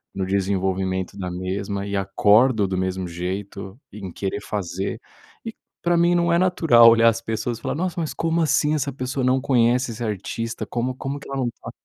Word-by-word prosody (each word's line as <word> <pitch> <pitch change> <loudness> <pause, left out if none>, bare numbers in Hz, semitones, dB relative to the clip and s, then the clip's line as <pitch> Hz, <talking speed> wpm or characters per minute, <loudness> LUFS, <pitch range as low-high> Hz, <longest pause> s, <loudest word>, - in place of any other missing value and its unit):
no 95 -1 -1
desenvolvimento 95 -1 -1
da 90 -2 -4
mesma 100 +2 -3
e 100 0 -3
acordo 105 +3 +3
do 95 -1 -2
mesmo 95 -1 -2
jeito, 95 +4 -5 0.2
em 95 -4 -7
querer 100 +3 -4
fazer, 100 +3 -4 0.5
e 225 - -5 0.3
pra 175 0 +2
mim, 170 +1 +4
não 170 0 +2
é - - +4
natural 165 -10 +6
olhar 115 0 +5
as 115 +1 -2
pessoas 115 +1 -3
e - - -17
falar: - - -2
"Nossa, 180 +1 -2
mas 155 - -3
como 165 0 0
assim, 150 -1 +2
essa 140 -1 -1
pessoa 130 0 -3
não 130 +1 +3
conhece 125 -2 +2
esse 115 +2 -6
artista? 110 +2 -4
Como 125 +2 -2
como 140 +2 -5
que - - -12
ela 135 - -4
não 125 -2 0
tá, - - -10
115 Hz, 195 wpm, -23 LUFS, 95-135 Hz, 0.5 s, natural